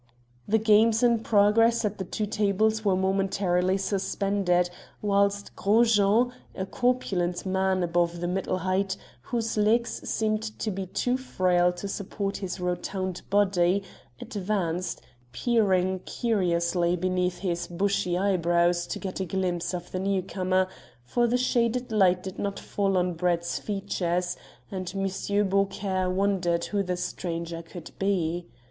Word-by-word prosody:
The 220 - +3
games 220 +1 +4
in 235 -2 +4
progress 225 +2 +3
at 210 0 -2
the - - -1
two 210 +4 -2
tables 215 +1 +1
were 195 -3 +3
momentarily 190 -1 +1
suspended, 195 -2 0 0.3
whilst 200 0 +1
Gros 225 +3 +3
Jean, 215 +5 +3 0.2
a 190 - -3
corpulent 190 -8 0
man 190 -1 +1
above 170 0 0
the 175 - -2
middle 185 +1 -1
height, 190 +2 0 0.2
whose 225 - -2
legs 225 +3 +1
seemed 215 -1 0 0.2
to 215 - -2
be 190 0 -4
too 245 +7 0
frail 180 -8 +2
to 180 +3 -6
support 200 0 -3
his 190 -1 -5
rotund 180 +1 -3
body, 195 -1 +3 0.4
advanced, 185 -4 -2 0.3
peering 190 - +2
curiously 175 -5 0
beneath 180 0 0
his 175 -3 -2
bushy 190 0 0
eyebrows 175 -2 +2
to - - -3
get 190 -1 -5
a 190 - -1
glimpse 175 -1 -1
of 175 -1 -6
the 185 - -2
newcomer, 185 -1 0 0.4
for 240 - +1
the 245 +2 +2
shaded 245 -1 0
light 185 -4 +3
did 190 -1 -7
not 200 0 -2
fall 195 -2 0
on 180 0 +1
Brett's 170 0 0
features, 180 -3 -2 0.4
and 185 -2 -4
M. 195 +1 0
Beaucaire 195 -1 0
wondered 185 -3 +1
who 205 -1 -1
the 180 -2 -2
stranger 170 -1 -4
could 165 0 -10
be. 175 -3 0
190 Hz, 140 wpm, -27 LUFS, 180-205 Hz, 0.4 s, games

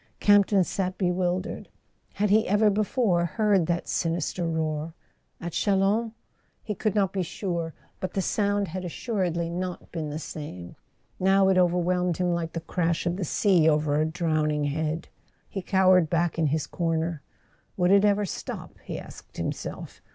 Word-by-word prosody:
Camp 205 -1 +5
ton 195 -3 +3
sat 185 +1 -2
bewildered. 180 +1 -1 0.5
Had 205 0 +1
he 215 +1 +4
ever 210 +2 +4
before 205 -3 +1
heard 195 0 +2
that 170 0 -1
sinister 170 +1 -1
roar? 160 0 -2 0.4
At 170 - -5
Chalons? 205 +5 +1 0.5
He 210 - -3
could 210 +1 -1
not 195 -3 +2
be 195 - 0
sure. 170 -2 -3 0.2
But 185 - -4
the 195 - +1
sound 205 -1 0
had 185 +3 -5
assuredly 175 -2 -2
not 180 +1 -5
been 160 -3 -4
the 150 - -4
same; 145 - -7 0.4
now 190 +1 +4
it 190 - +3
overwhelmed 180 0 +2
him 180 -1 +1
like 165 -1 -3
the 165 - -3
crash 170 0 -1
of 175 0 0
the 190 - -3
sea 175 -1 +3
over 150 -1 +2
a - - +3
drowning 155 -3 0
head. 155 +2 -2 0.4
He 195 - -5
cowered 185 -3 +4
back 170 0 0
in 160 - +3
his 150 0 0
corner. 165 -2 -1 0.6
Would 180 0 +3
it 200 0 +6
ever 205 0 +3
stop, 185 - -7
he - - -5
asked - - -12
himself? - - -5
180 Hz, 165 wpm, -26 LUFS, 165-195 Hz, 0.6 s, it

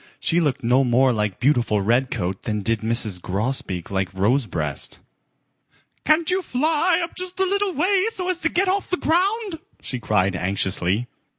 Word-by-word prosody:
She 170 - +1
looked 145 -8 0
no 125 +3 +3
more 125 +1 +3
like 105 -4 -2
beautiful 120 -5 +2
Redcoat 110 -5 0
than 105 -2 -2
did 115 +1 0
Mrs. 110 -5 +1
Grosbeak 100 -2 -2
like 95 -1 -1
Rosebreast. 95 - -1 1.1
"Can't 310 +3 +3
you 370 +1 +1
fly 325 +4 +1
up 335 - -5
just 365 0 -5
a 380 - +3
little 400 0 0
way 375 +5 +2
so 370 -5 -5
as 365 -2 0
to 320 - +1
get 375 +4 +1
off 385 +2 0
the 365 - 0
ground?" 375 +3 0 0.2
she 130 - -5
cried 100 -4 +1
anxiously. 95 +3 0
130 Hz, 165 wpm, -22 LUFS, -, 1.1 s, no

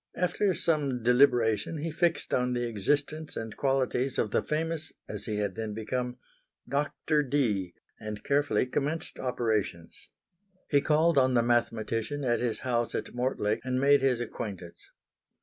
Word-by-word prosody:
After 180 +1 +1
some 140 -7 0
deliberation 120 +1 +3
he 160 +2 -3
fixed 170 +1 0
on 125 0 +1
the 120 -1 -1
existence 145 +8 -1
and 110 -1 -5
qualities 135 -1 0
of 105 - 0
the - - +2
famous 160 +1 -2 0.2
(as - - -6
he 110 - -2
had 105 -2 -1
then 110 -1 -4
become) 125 +3 -3 0.5
Doctor 150 +2 0
Dee, 115 -11 0 0.2
and 105 -1 -6
carefully 140 -5 +2
commenced 150 +5 -3
operations. 110 -9 -2 0.6
He 140 -2 +5
called 155 +1 +3
on 130 -1 +3
the 120 - +4
mathematician 115 +3 0
at 120 -2 +1
his 120 -2 -2
house 120 -2 -1
at - - -4
Mortlake 120 -3 0
and 130 0 -1
made 140 +1 +5
his 130 -3 +2
acquaintance. 100 -6 -6
125 Hz, 150 wpm, -29 LUFS, 110-145 Hz, 0.6 s, He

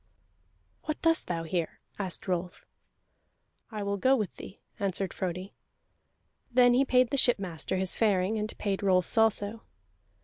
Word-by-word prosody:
"What 310 -1 -3
dost 330 0 +2
thou 165 -2 -2
here?" 165 0 -3 0.2
asked 190 -2 -3
Rolf. 180 -1 -3 1.0
"I 215 -3 -5
will 200 0 -1
go 260 +7 +4
with 215 -7 -2
thee," 195 - -10 0.2
answered 195 -1 -2
Frodi. 185 +1 -4 1.0
Then 245 0 +5
he 255 +3 +4
paid 255 -2 +3
the 280 - 0
shipmaster 190 -8 +1
his 185 0 0
faring, 210 -1 +1
and 210 +1 -4
paid 200 -2 -2
Rolf's 185 -3 +2
also. 225 -1 +2
200 Hz, 140 wpm, -29 LUFS, 185-230 Hz, 1.0 s, Then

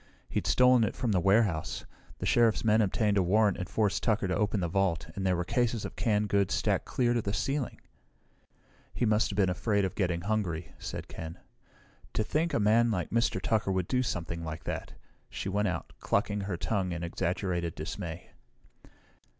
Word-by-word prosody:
He'd - - -2
stolen 125 -2 +5
it 105 - -1
from 120 -1 -1
the 95 - +3
warehouse. 90 -6 +1 0.3
The - - -4
Sheriff's 115 -2 +3
men 110 0 +5
obtained 105 0 +1
a - - +5
warrant 100 +2 +3
and 90 - -4
forced 105 -3 +1
Tucker 105 -3 +1
to 95 - 0
open 105 -1 +1
the 85 - 0
vault, 90 -2 0
and 95 - -3
there 90 - +3
were 90 0 -2
cases 120 +1 0
of - - -7
canned 105 -2 +1
goods 100 -1 +2
stacked - - 0
clear 120 -2 +1
to 120 - +1
the 100 -1 -2
ceiling!" 135 -3 -2 1.2
"He 120 - +1
must 110 0 +2
have 100 - -5
been 100 -2 +4
afraid 100 +2 +1
of 95 - -3
getting 90 -4 0
hungry," 90 -5 -2
said - - -6
Ken. 80 +1 -7 0.8
"To 110 - +2
think 160 +9 0
a - - +1
man 115 +3 +4
like 90 -8 -2
Mr. 115 +1 +1
Tucker 110 -3 0
would 95 -2 0
do 125 - +1
something 85 -7 -3
like 80 -1 -6
that!" - - -5 0.4
She 95 - -4
went 105 +2 +1
out, 90 -2 -4
clucking 100 0 0
her 95 -3 -3
tongue 95 -2 -1
in 85 0 -4
exaggerated 85 0 -2
dismay. 80 +2 -6
100 Hz, 190 wpm, -30 LUFS, 90-110 Hz, 1.2 s, stolen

